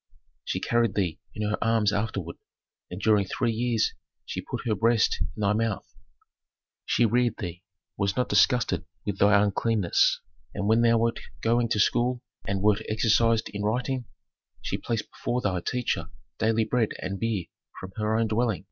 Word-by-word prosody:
She -, -, -2 dB
carried 120 Hz, -1 st, +1 dB
thee 90 Hz, -6 st, -1 dB, 0.2 s
in 105 Hz, +1 st, -2 dB
her 105 Hz, -, -1 dB
arms 110 Hz, -3 st, +2 dB
afterward, 100 Hz, -5 st, -3 dB, 0.5 s
and 90 Hz, -, -6 dB
during 105 Hz, -2 st, +3 dB
three 105 Hz, +4 st, -1 dB
years 115 Hz, 0 st, 0 dB, 0.3 s
she -, -, -4 dB
put -, -, -6 dB
her 115 Hz, -, +1 dB
breast 115 Hz, +2 st, +2 dB
into -, -, -3 dB
thy 100 Hz, 0 st, +3 dB
mouth. 110 Hz, -1 st, -1 dB, 1.0 s
She 120 Hz, -, +3 dB
reared 120 Hz, 0 st, +2 dB
thee, 90 Hz, -4 st, -6 dB, 0.4 s
was 100 Hz, 0 st, 0 dB
not 125 Hz, -, +1 dB
disgusted 125 Hz, -3 st, +3 dB, 0.2 s
with 100 Hz, -2 st, -3 dB
thy 100 Hz, 0 st, +6 dB
uncleanness. 105 Hz, -2 st, +2 dB, 0.4 s
And 100 Hz, -, -2 dB
when 110 Hz, +2 st, +4 dB
thou 115 Hz, 0 st, +4 dB
wert 115 Hz, +1 st, +1 dB, 0.2 s
going 115 Hz, +1 st, +2 dB
to 105 Hz, -, +1 dB
school 125 Hz, +4 st, +2 dB, 0.2 s
and 100 Hz, 0 st, -1 dB
wert 105 Hz, 0 st, +3 dB
exercised 110 Hz, +1 st, +2 dB
in 105 Hz, -, -5 dB
writing, 125 Hz, +4 st, -1 dB, 0.5 s
she -, -, -3 dB
placed 115 Hz, -2 st, -2 dB
before 125 Hz, -, -2 dB
thy 95 Hz, -6 st, -1 dB
teacher 125 Hz, +5 st, -2 dB, 0.3 s
daily 110 Hz, 0 st, +2 dB
bread 120 Hz, -2 st, 0 dB
and 100 Hz, 0 st, -4 dB
beer 110 Hz, -6 st, -1 dB, 0.3 s
from 95 Hz, -, -8 dB
her 110 Hz, 0 st, +1 dB
own 115 Hz, -, +2 dB
dwelling." 110 Hz, -1 st, 0 dB
110 Hz, 165 wpm, -27 LUFS, 100-115 Hz, 1.0 s, thy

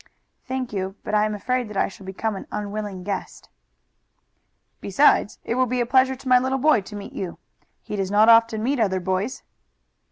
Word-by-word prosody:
"Thank 260 Hz, -3 st, -3 dB
you, 190 Hz, -1 st, -3 dB
but 210 Hz, -, -5 dB
I 210 Hz, 0 st, +4 dB
am 215 Hz, 0 st, -2 dB
afraid 250 Hz, +2 st, -2 dB
that 210 Hz, -, -6 dB
I -, -, +2 dB
shall 195 Hz, -1 st, -12 dB
become 210 Hz, +3 st, -3 dB
an 195 Hz, -, -8 dB
unwilling 205 Hz, -2 st, -4 dB
guest." 200 Hz, +1 st, -5 dB, 1.3 s
"Besides, 205 Hz, +1 st, +3 dB
it -, -, -2 dB
will 255 Hz, +1 st, +2 dB
be 250 Hz, +1 st, -1 dB
a 240 Hz, -, +1 dB
pleasure 260 Hz, +1 st, +3 dB
to 260 Hz, -, -12 dB
my 250 Hz, 0 st, +6 dB
little 260 Hz, +1 st, -1 dB
boy 290 Hz, -4 st, +4 dB
to 210 Hz, +2 st, -11 dB
meet 200 Hz, -1 st, -8 dB
you. 180 Hz, -3 st, -5 dB, 0.5 s
He -, -, -5 dB
does 195 Hz, -2 st, -2 dB
not 210 Hz, +2 st, +4 dB
often 230 Hz, -1 st, +5 dB
meet 270 Hz, +2 st, 0 dB
other 190 Hz, -4 st, +1 dB
boys." 190 Hz, +6 st, -2 dB
215 Hz, 195 wpm, -23 LUFS, 200-250 Hz, 1.3 s, my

